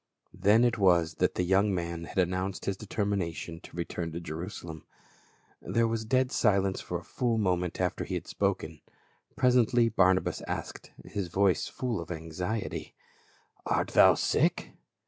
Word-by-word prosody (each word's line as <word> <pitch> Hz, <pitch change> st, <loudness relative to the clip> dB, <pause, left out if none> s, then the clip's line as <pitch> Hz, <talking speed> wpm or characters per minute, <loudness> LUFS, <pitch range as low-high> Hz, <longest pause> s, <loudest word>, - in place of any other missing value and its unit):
Then 110 Hz, +4 st, +4 dB
it 120 Hz, -2 st, +2 dB
was 85 Hz, -4 st, +4 dB
that -, -, +2 dB
the 90 Hz, -, 0 dB
)'oung 100 Hz, +1 st, +4 dB
man 85 Hz, -1 st, -4 dB
had -, -, -10 dB
announced 95 Hz, +1 st, -1 dB
his 100 Hz, -, -1 dB
determination 95 Hz, -5 st, -3 dB
to -, -, -13 dB
return 85 Hz, -1 st, -3 dB
to 85 Hz, -, -4 dB
Jerusalem. 80 Hz, 0 st, -7 dB, 0.8 s
There 115 Hz, 0 st, +1 dB
was 115 Hz, -1 st, -2 dB
dead 130 Hz, +2 st, +2 dB
silence 100 Hz, -3 st, +2 dB
for 90 Hz, -, -4 dB
a 85 Hz, -, -10 dB
full 120 Hz, +3 st, -1 dB
moment 90 Hz, -4 st, 0 dB
after 90 Hz, -2 st, -1 dB
he -, -, -4 dB
had -, -, -4 dB
spoken; 95 Hz, -6 st, -2 dB, 0.5 s
pres 125 Hz, -1 st, +3 dB
ently 120 Hz, 0 st, +3 dB
Barnabas 95 Hz, -1 st, +3 dB
asked -, -, -5 dB
— -, -, -15 dB
his 100 Hz, -3 st, -4 dB
voice 95 Hz, 0 st, +2 dB
full 120 Hz, -7 st, -3 dB
of 85 Hz, -, -9 dB
anxiety: 90 Hz, +6 st, -4 dB, 0.7 s
"Art -, -, 0 dB
thou -, -, +6 dB
.sick?" -, -, +1 dB
95 Hz, 160 wpm, -29 LUFS, 85-110 Hz, 0.8 s, thou